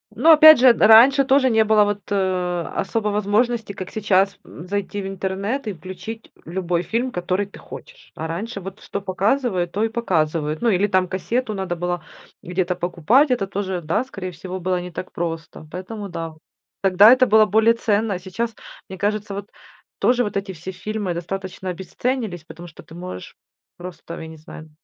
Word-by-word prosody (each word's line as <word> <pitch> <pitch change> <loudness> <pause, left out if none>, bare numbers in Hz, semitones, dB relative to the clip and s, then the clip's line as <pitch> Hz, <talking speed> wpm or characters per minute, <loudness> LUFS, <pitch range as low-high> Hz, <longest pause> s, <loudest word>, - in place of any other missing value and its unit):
Но 315 +8 +5
опять 310 -1 +9
же, 250 -1 +7
д 215 - +3
раньше 265 +5 +7
тоже 265 -1 +4
не 225 -1 +4
было, 215 -1 +5
вот, 205 -2 -3
особо 185 +2 -1
возможности, 210 +2 0
как 185 -1 -7
сейчас, 200 -2 +1
зайти 200 +4 -5
в 190 - -5
интернет 195 +6 -3
и 205 - -2
включить 185 +6 -9
любой 175 0 -2
фильм, 240 +6 -2
который 180 +3 -1
ты 200 - -14
хочешь. - - -13
А 160 - -5
раньше 195 +5 -5
вот 195 +2 -8
что 200 - -5
показывают, 195 -1 0
то 210 - 0
и 225 - +1
показывают. 160 -9 -1
Ну 235 - +2
или 200 0 +2
там 185 -2 +2
кассету 220 +5 -2
надо 190 -3 -3
было 175 -1 -3 0.4
где-то 180 0 -2
покупать, 180 - +2
это 195 -6 0
тоже, 190 -2 -3
да, 165 +10 0
скорее 185 -7 -7
всего, 185 +3 -7
было 180 0 0
не 180 0 -7
так 185 - -7
просто. 165 -2 -5
Поэтому 200 +3 -6
да, 165 -3 -6 0.5
тогда 195 +4 +7
это 255 0 +5
было 215 +1 +6
более 220 +3 +4
ценно. 215 -2 0
А 180 - -4
сейчас, 220 +5 -4 0.3
мне 190 - -8
кажется, 205 +1 -2
вот, 200 +1 -6 0.5
тоже 245 0 +3
вот 205 -2 -3
эти 195 -1 -4
все 170 +3 -7
фильмы 210 -1 -4
достаточно 190 +2 -6
обесценились, 190 - -3
потому 175 +1 -11
что 155 - -13
ты 160 - -14
можешь 175 - -8 0.4
просто, 175 -1 -9
я 160 - -7
не 160 0 -11
знаю, 155 0 -12
195 Hz, 180 wpm, -21 LUFS, 180-220 Hz, 0.5 s, опять